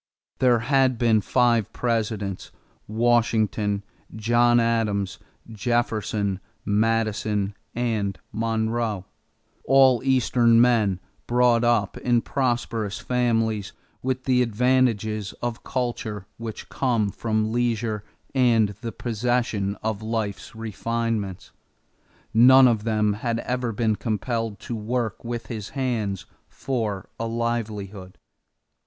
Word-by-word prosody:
There 125 -2 +4
had 130 0 +2
been 115 -2 +3
five 120 -1 +2
Presidents 110 -5 -2 0.4
Washington, 110 -3 +1 0.3
John 120 +2 +3
Adams, 110 -4 0 0.3
Jefferson, 110 -3 -1 0.3
Madison, 105 -1 0 0.2
and 110 -5 -1
Monroe 110 -2 -1 0.6
all 135 -3 +5
Eastern 120 -3 +4
men 110 -6 +3 0.3
brought 120 -1 +3
up 115 -5 +1
in 120 -1 +2
prosperous 120 -5 -1
families 115 -4 0 0.3
with 130 0 -2
the 125 -1 +3
advantages 115 -3 +1
of 120 -1 -5
culture 115 -5 -3
which 110 -2 -7
come 115 -6 0
from 110 0 -1
leisure 115 -3 -1 0.3
and 120 -5 +4
the 115 -2 -4
possession 115 -4 -1
of 110 -1 -2
life's 110 -3 -3
refinements. 110 -3 -3 0.8
None 130 +3 +8
of 110 -3 +1
them 105 -2 +2
had 115 +2 -2
ever 125 -1 -2
been 110 0 +1
compelled 115 -1 -2
to 120 - -5
work 115 -1 -2
with 115 -1 -4
his 110 -3 -6
hands 110 -7 -1 0.2
for 110 -7 -3
a 115 - -2
livelihood. 105 -5 -3
115 Hz, 105 wpm, -24 LUFS, 105-120 Hz, 0.8 s, None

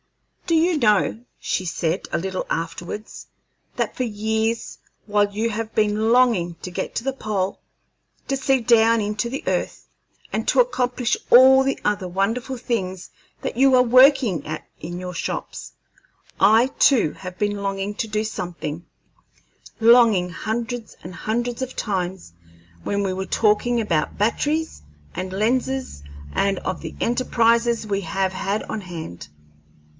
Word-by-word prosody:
"Do 335 - +2
you 330 0 +2
know," 215 -1 +2 0.2
she - - -2
said, 170 0 -2
a - - 0
little 185 +2 -3
afterwards, 175 +5 -5 0.5
"that - - -1
for 255 - -1
years, 220 +1 -2 0.3
while 205 -1 +1
you 220 +3 -1
have 220 +1 -4
been 215 +1 +2
longing 230 -9 +3
to 180 - -5
get - - -4
to - - -2
the 270 - 0
pole, 205 -6 -3 0.7
to 275 - 0
see 270 0 +2
down 230 0 +4
into 210 +3 -2
the 270 +3 -5
earth, - - -2 0.5
and - - -2
to - - +3
accomplish 250 - +1
all 265 +2 +8
the 270 0 -1
other 205 -3 0
wonderful 225 +8 -1
things 190 -7 -3 0.3
that - - -3
you 265 +2 +4
are 250 - +6
working 255 - +5
at 155 +1 -6
in 175 0 -6
your 180 0 -6
shops, - - -5 0.7
I 220 +5 +5
too 235 - +4
have 185 -1 -9
been 205 -1 -1
longing 195 +1 -2
to 225 - -3
do 215 0 -1
something 175 -6 -5 1.0
longing 225 -6 +5
hundreds 230 +3 -4
and 180 - -8
hundreds 240 +3 -2
of 260 0 -4
times 185 - -3 0.5
when 200 0 -1
we 190 -1 -1
were 190 +1 -4
talking 230 +3 +2
about 170 -9 -1
batteries 300 +9 0 0.3
and 185 0 -5
lenses 250 - -1 0.3
and 195 -1 +1
of 180 - -4
the - - -7
enterprises 235 -1 +2
we 200 -1 -1
have 190 +2 -1
had 195 +3 -2
on 220 - -5
hand." 160 - -8
215 Hz, 150 wpm, -22 LUFS, 190-240 Hz, 1.0 s, all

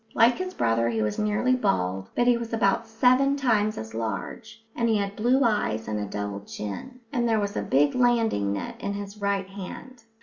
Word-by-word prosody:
Like 235 +6 +5
his 370 0 -4
brother, 115 +1 +1
he 110 -2 0
was 105 - -2
nearly 210 +5 +2
bald, 95 - -1
but 240 - +2
he 245 0 +5
was 235 -1 -5
about 220 +1 +1
seven 255 +5 +3
times 220 -6 +1
as 110 0 -7
large, 165 - -5
and 235 -1 +1
he 220 - +3
had 200 0 -2
blue 250 +5 +3
eyes 110 - 0
and 105 -1 -2
a 105 - -2
double 100 0 -4
chin, 105 - -7
and 240 -1 +1
there 220 -1 +3
was 205 0 -2
a - - 0
big 145 +2 +2
landing 230 - +2
net 100 -1 -5
in 200 - -2
his 205 +1 -7
right 200 -1 0
hand. 205 +6 -9
210 Hz, 205 wpm, -26 LUFS, -, -, Like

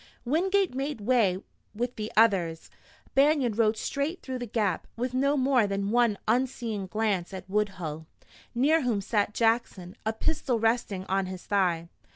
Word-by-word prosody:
Wingate 375 +6 +1
made 270 0 -3
way 205 -5 +2 0.3
with 245 +3 -2
the 215 0 -5
others. 185 -8 +2 0.4
Banion 275 -4 +3
rode 220 0 +2
straight 285 +9 -3
through 260 -1 -4
the 245 - -5
gap, 205 -5 -1
with 250 +2 -2
no 280 +3 +2
more 260 -4 +3
than 200 +1 -2
one 235 -3 +3
unseeing 230 -4 -1
glance 200 -3 -1
at 185 - -8
Woodhull, 185 -6 -2 0.5
near 300 +7 +3
whom 240 -6 0
sat 205 +1 0
Jackson, 225 -6 0
a 220 - 0
pistol 255 +1 -1
resting 225 -4 0
on 195 0 0
his 185 -1 -7
thigh. 180 -5 +1
225 Hz, 155 wpm, -28 LUFS, 195-255 Hz, 0.5 s, Banion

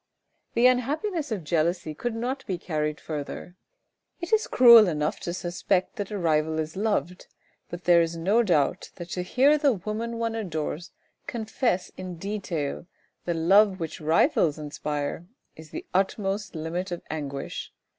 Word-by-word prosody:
The 235 +1 +4
unhappiness 290 - +1
of 200 -6 -2
jealousy 165 0 0
could 235 +9 -3
not 255 +4 -3
be 185 - -1
carried 150 -3 -2
further. 155 +3 -6 0.6
It 345 +3 -5
is 440 0 +3
cruel 235 -4 +8
enough 150 -3 -1
to 175 - -4
suspect 180 +3 -1
that 205 -2 -3
a 210 - -4
rival 160 -3 +1
is 155 0 -3
loved, 195 -3 -1 0.4
but 175 +1 -7
there 175 -1 +6
is 165 0 -1
no 200 +8 +3
doubt 175 -4 +1
that 175 -1 -9
to 180 - -2
hear 270 +11 +3
the 285 -3 +4
woman 220 +4 -4
one 230 -1 -1
adores 170 -6 -4 0.4
confess 220 -4 -1
in 185 -1 -6
detail 170 -5 -4 0.4
the 170 - -1
love 190 +4 +4
which 165 -2 -5
rivals 155 0 +3
inspires, 150 +1 -4 0.3
is 160 0 -12
the - - -7
utmost 195 +1 -1
limit 170 +4 -3
of 175 - -5
anguish. 140 -3 -5
180 Hz, 155 wpm, -26 LUFS, 160-220 Hz, 0.6 s, cruel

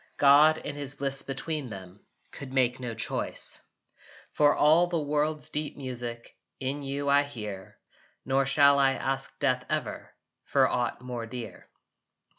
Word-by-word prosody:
God 145 +3 +6
in 145 - -6
his 145 -1 -2
Bliss 135 0 -2
between 140 0 -4
them 95 -2 -10 0.3
Could 135 -2 -9
make 130 -1 +1
no 120 -3 -5
choice. 115 - -4 0.7
For 145 -1 +4
all 160 +4 +5
the 175 -1 -1
world's 150 +1 -1
deep 150 0 -3
music 120 -3 -6 0.2
In 135 +2 -3
you 140 +1 -3
I 140 0 +5
hear: 105 -9 -7 0.5
Nor 135 0 +1
shall 140 +1 +5
I 135 -1 +4
ask 135 +1 -3
death, 130 -3 +1
ever, - - -4 0.3
For - - +3
aught 120 0 -1
more 120 -2 -5
dear. 115 -1 -8
135 Hz, 145 wpm, -28 LUFS, 125-145 Hz, 0.7 s, God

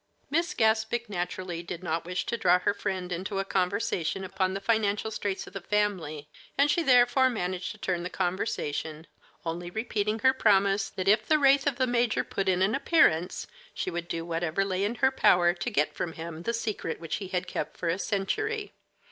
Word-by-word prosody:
Miss 340 +4 0
Gaspic 220 +1 +1
naturally 180 -1 -3
did 170 +1 -7
not 165 -1 -2
wish 180 +1 -2
to - - -1
draw 180 -6 +4
her 180 - 0
friend 185 -3 -3
into 190 +3 -3
a 195 - 0
conversation 190 -1 -1
upon 190 0 -1
the - - -2
financial 220 0 0
straits 205 -2 -3
of - - -13
the 195 - -5
family, 175 -8 -1 0.3
and 285 +1 +4
she 345 - +2
therefore 255 -2 +5
managed 180 -5 -3
to - - -15
turn 185 -4 -2
the 180 - -4
conversation, 160 -4 -2 0.4
only 170 +1 -3
repeating 215 +1 -1
her 260 +4 +4
promise 200 -4 +3
that 185 0 -5
if 215 +2 +4
the 310 - +5
wraith 275 -1 +4
of 280 - +1
the 255 - +1
major 240 -2 +1
put 195 -1 -2
in 185 0 +2
an 200 +3 +2
appearance, 180 - +2 0.3
she 185 - -2
would 170 0 -4
do 165 -1 -3
whatever 170 +2 -1
lay 190 0 -1
in 210 +4 -1
her 265 +1 +3
power 175 -9 +4
to 175 - -3
get 150 +2 +1
from 165 - -3
him 165 0 -7
the 230 - -1
secret 215 -7 -3
which 165 -1 -3
he 195 - -6
had 180 0 -2
kept - - -4
for 175 - -3
a 170 +3 0
century. 415 - -2
195 Hz, 200 wpm, -28 LUFS, 175-225 Hz, 0.4 s, therefore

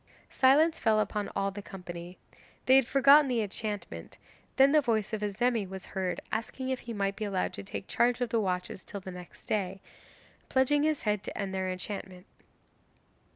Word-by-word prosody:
Silence 305 +5 +4
fell 220 -1 +3
upon 210 0 -1
all 195 0 0
the 205 +1 -7
company 180 -3 -9 0.5
they 260 - +6
had 265 -3 +5
forgotten 275 +2 +6
the 240 -4 +1
enchantment; 200 - -5 0.4
then 270 +1 +6
the 305 0 +5
voice 220 -4 0
of 215 - -2
Azemi 220 +2 0
was 190 0 -7
heard 185 -2 -2
asking 245 +4 -3
if 260 -1 -1
he 235 - -8
might 200 -2 -1
be 215 - -5
allowed 195 -3 -1
to - - -6
take 195 0 -7
charge 240 0 +2
of 245 -2 -1
the 230 0 +1
watches 180 -1 -3
till 200 - -7
the 190 -1 -8
next 180 -1 -12
day, 195 -2 -1 0.7
pledging 265 +3 +3
his 310 -1 0
head 210 -2 0
to - - -7
end 195 -2 -3
their 190 -1 -1
enchantment. 185 0 -6
210 Hz, 185 wpm, -29 LUFS, 190-250 Hz, 0.7 s, they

